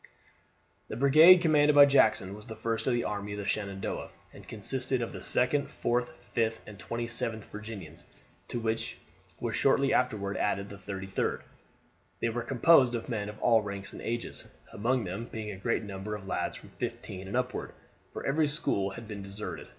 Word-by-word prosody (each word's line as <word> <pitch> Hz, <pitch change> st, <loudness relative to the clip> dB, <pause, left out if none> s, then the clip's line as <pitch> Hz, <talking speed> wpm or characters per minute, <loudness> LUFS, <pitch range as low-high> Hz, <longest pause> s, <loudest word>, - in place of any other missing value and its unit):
The -, -, -5 dB
brigade 155 Hz, +7 st, +8 dB
commanded 150 Hz, -2 st, +4 dB
by 145 Hz, -1 st, +10 dB
Jackson 110 Hz, -8 st, +3 dB
was 105 Hz, +1 st, -11 dB
the 110 Hz, -, -7 dB
first 115 Hz, +1 st, -2 dB
of 130 Hz, -, +3 dB
the 120 Hz, -, +1 dB
army 100 Hz, 0 st, -3 dB
of -, -, -5 dB
the 100 Hz, -, -4 dB
Shenandoah, 100 Hz, -2 st, -3 dB, 0.2 s
and -, -, -13 dB
consisted 130 Hz, +4 st, -2 dB
of 115 Hz, -, -3 dB
the -, -, -6 dB
2d, 135 Hz, +3 st, +2 dB
4th, 120 Hz, +1 st, -1 dB, 0.2 s
5th, 115 Hz, -1 st, +1 dB
and 105 Hz, -2 st, -11 dB
27th 115 Hz, -2 st, -3 dB
Virginians, 105 Hz, -7 st, -9 dB, 0.4 s
to 120 Hz, -, -3 dB
which 110 Hz, 0 st, -2 dB, 0.4 s
was -, -, -2 dB
shortly 135 Hz, 0 st, +3 dB
afterward 105 Hz, -6 st, 0 dB
added 100 Hz, -1 st, 0 dB
the 100 Hz, -, -8 dB
33d. 95 Hz, 0 st, -3 dB, 0.8 s
They 115 Hz, -, +1 dB
were 120 Hz, +1 st, -2 dB
composed 130 Hz, +1 st, +5 dB
of 115 Hz, -, -5 dB
men 105 Hz, -4 st, -2 dB
of 105 Hz, -, -9 dB
all 115 Hz, -2 st, +5 dB
ranks 100 Hz, -1 st, -5 dB
and -, -, -8 dB
ages, 120 Hz, 0 st, -4 dB, 0.3 s
among 120 Hz, +4 st, +1 dB
them 100 Hz, +6 st, -5 dB
being 110 Hz, -1 st, -5 dB
a 95 Hz, -, -7 dB
great 115 Hz, +4 st, 0 dB
number 100 Hz, +1 st, -5 dB
of 100 Hz, -2 st, -9 dB
lads 95 Hz, -, -2 dB
from -, -, -14 dB
fifteen 95 Hz, 0 st, -6 dB
and 100 Hz, -, -2 dB
upward; 125 Hz, 0 st, -2 dB, 0.4 s
for -, -, -6 dB
every 150 Hz, +2 st, +2 dB
school 100 Hz, -9 st, 0 dB
had 115 Hz, +3 st, -9 dB
been 105 Hz, -2 st, -6 dB
deserted. 100 Hz, +2 st, -6 dB
115 Hz, 180 wpm, -30 LUFS, 100-125 Hz, 0.8 s, by